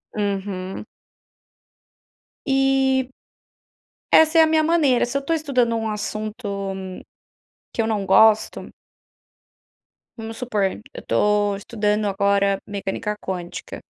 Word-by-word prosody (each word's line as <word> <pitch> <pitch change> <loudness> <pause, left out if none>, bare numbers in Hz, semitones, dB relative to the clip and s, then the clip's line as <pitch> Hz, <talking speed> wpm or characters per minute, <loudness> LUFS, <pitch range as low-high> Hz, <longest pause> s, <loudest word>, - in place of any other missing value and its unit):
Uhum. 195 -2 -3 1.6
E, 270 -1 +2 1.0
essa 320 +1 +6
é - - +9
a - - +5
minha 315 0 +3
maneira, 305 -6 +3
se 260 +3 -2
eu - - -5
estou 325 +4 -1
estudando 255 -7 0
um 225 -1 -2
assunto, 215 +1 -4 1.3
que - - 0
eu 220 - -1
não 210 -3 -1
gosto 220 +3 +4 1.5
vamos 225 0 -7
supor, 225 -5 -1 0.3
eu - - -9
tô 205 -1 +2
estudando, 210 +1 -1
agora, 200 0 +1
mecânica 200 +1 -4
quântica 180 -2 -6
215 Hz, 110 wpm, -22 LUFS, 200-265 Hz, 1.6 s, é